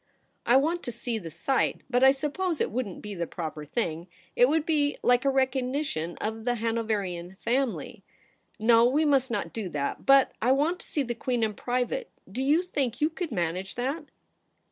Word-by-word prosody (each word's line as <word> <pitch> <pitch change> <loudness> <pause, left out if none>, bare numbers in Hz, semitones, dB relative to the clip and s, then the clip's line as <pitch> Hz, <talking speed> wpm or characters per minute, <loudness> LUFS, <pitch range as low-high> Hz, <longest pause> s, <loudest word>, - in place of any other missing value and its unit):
' - - -44
I 245 - +6
want 330 +5 +1
to 245 - -5
see 235 0 -3
the 170 -5 -7
sight, 215 - 0
but 250 0 +2
I 265 - +9
suppose 300 +5 -1
it - - 0
wouldn't 220 -5 -4
be 210 -1 -5
the 170 -3 -3
proper 155 -3 -5
thing. 170 -1 -2 0.3
It 245 +1 +5
would 310 0 +1
be 295 -3 +1
like 245 +2 +3
a - - +5
recognition 260 - -1
of 220 +1 -3
the 245 +1 +1
Hanoverian 210 -6 -2
family. 250 +1 -1 0.5
No; 230 +1 +5
we 280 +6 +3
must 270 -3 +3
not 235 - -3
do 215 -5 -4
that. 145 -3 -3
But 275 -1 +6
I 250 +4 +4
want 310 +7 +1
to - - -14
see 290 - 0
the 240 -2 -3
Queen 240 0 -1
in 215 -1 0
private; 250 - -2 0.2
do 255 - -4
you 300 +6 +3
think 270 -9 -2
you 305 +2 +2
could 335 -1 -4
manage 180 -1 -2
that 270 +6 -2
245 Hz, 195 wpm, -27 LUFS, 215-275 Hz, 0.5 s, I